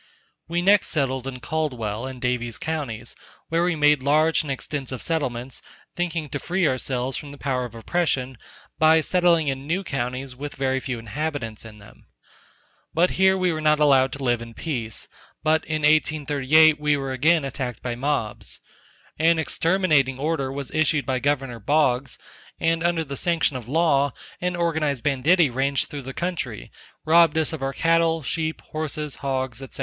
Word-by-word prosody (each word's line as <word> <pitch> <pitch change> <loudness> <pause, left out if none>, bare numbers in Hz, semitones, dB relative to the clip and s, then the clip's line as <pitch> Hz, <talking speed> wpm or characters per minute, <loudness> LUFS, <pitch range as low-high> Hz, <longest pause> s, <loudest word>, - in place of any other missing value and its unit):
We 175 +1 -1
next 200 +1 +5
settled 135 -4 -1
in 125 -2 -6
Caldwell, 125 -5 -2
and 130 -1 -8
Davies 120 -2 -2
counties, 135 -8 -4 0.3
where 165 +1 +1
we 175 -1 +1
made 150 -2 +4
large 155 +4 +3
and 145 - -5
extensive 135 -1 -4
settlements, 130 -6 -3 0.3
thinking 170 -3 -2
to 145 - -4
free 180 +1 0
ourselves 130 -1 -1
from 145 -2 -8
the 145 - -11
power 130 -3 -1
of 115 -2 -10
oppression, 130 -2 -1 0.4
by 160 0 +6
settling 170 -2 +2
in 135 0 -3
new 180 +5 0
counties 130 -3 -4
with 145 +3 -7
very 130 0 0
few 125 -1 -4
inhabitants 115 0 -4
in 110 -1 -11
them; 100 - -17 0.9
but 175 +3 +3
here 190 0 +3
we 180 -2 +1
were 155 - -3
not 150 0 +3
allowed 135 -3 +4
to 140 - -6
live 120 -2 +1
in 115 -1 -10
peace, 120 -9 -4 0.4
but 160 0 +2
in 155 -1 -2
1838 155 0 +4
we 150 -1 +2
were 135 -1 -4
again 155 +4 +3
attacked 130 -4 -5
by 120 - -2
mobs, 125 -3 -3 0.6
an 165 +1 +4
exterminating 160 -5 +1
order 140 -2 -1
was 140 0 -6
issued 155 -2 +1
by 130 -1 0
Gov. 135 -5 -1
Boggs, 140 -3 +2 0.4
and 165 0 +1
under 170 -1 +1
the 140 -2 -6
sanction 165 -2 +1
of 120 -3 -6
law 145 -2 +2 0.3
an 180 0 -1
organized 155 -7 0
banditti 145 +3 +3
ranged 135 +2 0
through 145 - -6
the 135 0 -7
country, 160 - -4 0.3
robbed 165 0 +5
us 160 0 +1
of 155 - -5
our 135 0 -1
cattle, 165 0 +2
sheep, 160 +5 -2
horses, 155 -1 -3
hogs, 130 -3 -2
&c. 135 -1 -9
145 Hz, 170 wpm, -24 LUFS, 130-160 Hz, 0.9 s, by